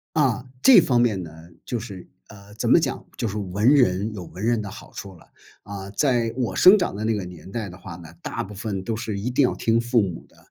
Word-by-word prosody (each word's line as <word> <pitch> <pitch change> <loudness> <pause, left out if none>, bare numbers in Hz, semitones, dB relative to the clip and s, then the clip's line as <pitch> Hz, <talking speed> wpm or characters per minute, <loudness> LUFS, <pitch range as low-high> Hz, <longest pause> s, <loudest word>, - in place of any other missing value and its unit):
啊， 130 -6 +1 0.2
这 265 - +9
方 125 -3 +2
面 110 -5 +1
呢， 80 - -10 0.3
就 120 - -3
是， 100 -5 -9 0.2
呃， 105 -1 -14
怎 - - -2
么 - - +7
讲， - - -2
就 - - -1
是 105 -1 -4
文 105 +6 +2
人 105 -5 +2
有 95 - -6
文 95 +5 -8
人 115 -1 +1
的 100 - -7
好 - - -12
处 100 - -8
了。 - - -19 0.4
啊， 100 -1 -7
在 120 0 +1
我 125 -3 -2
生 190 +3 +7
长 175 - -1
的 105 +2 -4
那 115 - +1
个 100 -3 -3
年 90 0 -11
代 110 -1 -4
的 90 - -11
话 90 -2 -9
呢， 80 -2 -13
大 - - -4
部 105 - -10
分 100 -1 -4
都 115 - -2
是 110 -2 -4
一 105 +5 -3
定 125 +3 +2
要 125 - 0
听 115 0 +1
父 120 -1 +2
母 90 -4 -5
的， - - -26
105 Hz, 270 characters per minute, -23 LUFS, 95-120 Hz, 0.4 s, 这